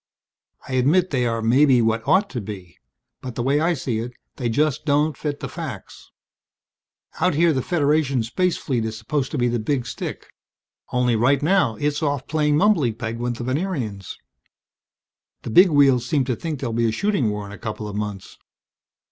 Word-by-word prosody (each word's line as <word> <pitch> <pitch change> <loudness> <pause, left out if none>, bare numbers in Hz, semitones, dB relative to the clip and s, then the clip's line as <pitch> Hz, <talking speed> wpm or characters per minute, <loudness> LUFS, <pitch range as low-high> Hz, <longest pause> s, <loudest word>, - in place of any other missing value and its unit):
I - - -6
admit 155 +9 +2
they 125 -4 +1
are 115 -1 -2
maybe 130 +3 +4
what 115 0 0
ought 195 +2 +4
to 120 - -4
be. 95 -4 -9 0.4
But 125 -2 -7
the 120 - -2
way 140 +3 +2
I 170 +2 +1
see 125 -5 -2
it 120 +2 -5 0.2
they 125 -3 -1
just 150 +4 0
don't 150 +1 +1
fit 145 -2 -4
the - - -3
facts. 155 - -8 1.1
Out 180 -1 +2
here 165 +1 +4
the 130 - 0
Federation 145 -5 +1
space 180 +11 0
fleet 125 -6 -2
is 110 0 -4
supposed 135 +4 -2
to - - -4
be 120 -1 +2
the 120 0 0
big 125 +2 -1
stick. 115 - -6 0.7
Only 125 -1 +2
right 135 +5 +2
now 180 -9 +2
it's 145 +5 -1
off 145 -3 -1
playing 150 -1 +1
mumbly 160 - +3
peg 115 -1 -4
with 120 0 -2
the 120 - -6
Venerians. 130 - -3 1.3
"The - - -5
Big 180 - +7
Wheels 140 -5 +4
seem 140 -1 +1
to 125 -1 -1
think 155 +2 -5
there'll 120 -4 -2
be 115 0 +1
a - - -1
shooting 180 - 0
war 105 0 -4
in 100 - -10
a 105 - -10
couple 110 -1 -5
of 105 - -6
months. 105 -2 -5
130 Hz, 190 wpm, -22 LUFS, 115-150 Hz, 1.3 s, Big